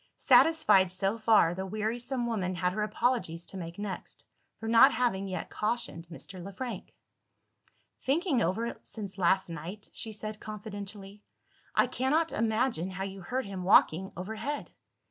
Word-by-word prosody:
Satisfied 260 - +5
so 195 +3 0
far, 220 -6 +4
the 190 +2 -4
wearisome 230 +5 -2
woman 190 -6 -1
had 180 +1 0
her 215 - -2
apologies 215 -6 0
to 195 - -9
make 170 -1 -7
next, 205 -2 -6 0.3
for 225 - -5
not 230 0 +7
having 195 -6 0
yet 185 -1 -5
cautioned 210 -6 -2
Mr. 175 +2 -8
Le 195 - -7
Frank. 235 0 -6 1.1
"Thinking 285 -1 +1
over 195 +6 0
it, 235 - -5
since 200 -3 -7
last 190 +1 +3
night," 170 +5 -8
she 220 - -2
said 215 0 -6
confidentially, 205 -1 -7 0.5
"I - - +5
cannot 305 +6 +1
imagine 220 -4 0
how 190 +1 -4
you 195 0 -6
heard 255 +8 -2
him 195 -2 -5
walking 185 0 +4
overhead. 220 +10 -4
205 Hz, 150 wpm, -30 LUFS, 185-235 Hz, 1.1 s, not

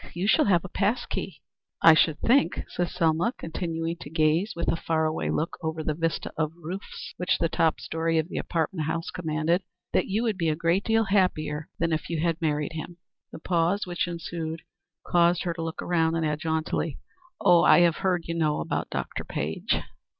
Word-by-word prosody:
You 175 +2 -1
shall 210 - +4
have 180 -3 +3
a - - -4
pass 210 +6 0
key." 150 -7 -5 0.4
"I 165 - +10
should 160 -1 +3
think," 270 +4 +3
said 175 -1 -1
Selma, 170 +5 +1
continuing 165 0 -3
to 145 - -9
gaze, 160 +6 +2
with 170 - -3
her - - +2
far 160 -1 0
away 155 0 -1
look, 160 - -2
over 160 -1 -3
the 155 - 0
vista 165 +1 -2
of 155 -1 0
roofs 180 +5 -7
which 180 - +1
the 165 - +1
top 160 0 +1
story 165 0 -1
of 160 0 +1
the - - -4
apartment 160 -1 -1
house 165 +2 -2
commanded, 160 +1 0 0.3
"that - - +2
you 210 +4 0
would 220 -5 -1
be 165 -2 +2
a 155 - +1
great 170 +4 +1
deal 225 0 +3
happier 170 -7 0
than 165 -1 0
if 155 - -2
you 165 -2 -1
had 165 0 0
married 150 -1 0
him." 165 +2 -6 0.3
The - - -8
pause 175 +4 +1
which 175 0 -2
ensued 165 -1 -5 0.4
caused 175 0 +3
her 175 -2 -1
to 165 - -6
look 165 0 -4
round, 165 -1 +1
and 165 - 0
add 150 0 -1
jauntily, 160 -2 -1 0.5
"I 175 -1 +7
have 170 -2 +4
heard, 180 -3 0
you 165 - -3
know, 155 -3 +1
about - - -2
Dr. - - -4
Page." 80 +2 -2
165 Hz, 200 wpm, -26 LUFS, 160-175 Hz, 0.5 s, I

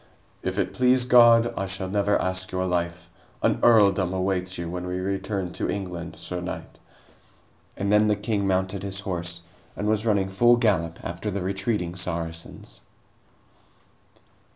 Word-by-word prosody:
"If - - -3
it - - -1
please 125 0 +3
God, 120 -1 +6
I 95 - -2
shall 95 0 -1
never 100 +1 +1
ask 95 0 -1
your 95 0 -1
life. 85 -1 -2 0.4
An - - +2
earldom 100 -5 +4
awaits 95 0 -1
you 85 -1 -4
when 90 +1 -5
we 90 0 -3
return 95 -1 -3
to - - -3
England, 90 -4 -5
sir 90 0 -4
knight." 90 - -7 1.0
And 100 +1 -1
then 105 0 +5
the 105 - +3
king 105 -1 -1
mounted 95 0 0
his 95 0 -3
horse 85 -3 -3 0.3
and 105 - -3
was 110 0 +1
running 100 -4 +1
full 120 +5 +4
gallop 90 -8 +1
after 85 +5 -4
the 100 -2 -3
retreating 95 -1 -2
Saracens. 85 -2 -5
95 Hz, 155 wpm, -25 LUFS, 90-105 Hz, 1.0 s, God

